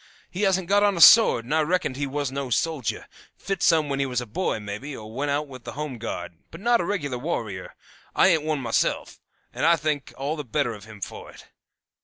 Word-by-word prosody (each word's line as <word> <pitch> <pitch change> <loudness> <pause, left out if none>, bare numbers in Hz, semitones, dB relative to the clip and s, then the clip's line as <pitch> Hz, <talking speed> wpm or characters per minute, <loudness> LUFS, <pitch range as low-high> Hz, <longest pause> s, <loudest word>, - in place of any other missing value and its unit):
He 185 - -4
hasn't 190 -3 +1
got 200 +2 +3
on 205 -3 +2
a - - -2
sword, 170 - +8
and 130 - -3
I 160 - +3
reckon 165 -2 0
he 140 +2 -3
was 140 -1 -3
no 140 -1 -4
soldier; 145 -1 -1 0.3
fit 195 -1 -4
some 160 -3 +4
when 140 -1 -2
he 135 - +1
was 125 -2 -1
a 125 - -5
boy, 115 - -2
maybe, 105 +8 -6
or 110 0 -10
went 140 +4 -2
out 145 +1 -1
with 130 -3 -11
the - - -7
home 145 -5 -5
guard, 85 -6 -6
but 165 - -11
not 235 +3 +3
a - - -2
regular 145 -10 -2
warrior. 110 - -4 0.4
I 190 - +5
ain't 165 -4 +3
one 155 -2 -2
myself, 115 -3 -1 0.3
and - - -4
I 170 +1 +6
think 150 -3 -2
all 140 +4 -2
the 150 - -5
better 125 -1 -1
of 105 -1 -11
him 110 -2 -13
for - - -7
it. - - -14
145 Hz, 235 wpm, -25 LUFS, 125-165 Hz, 0.4 s, sword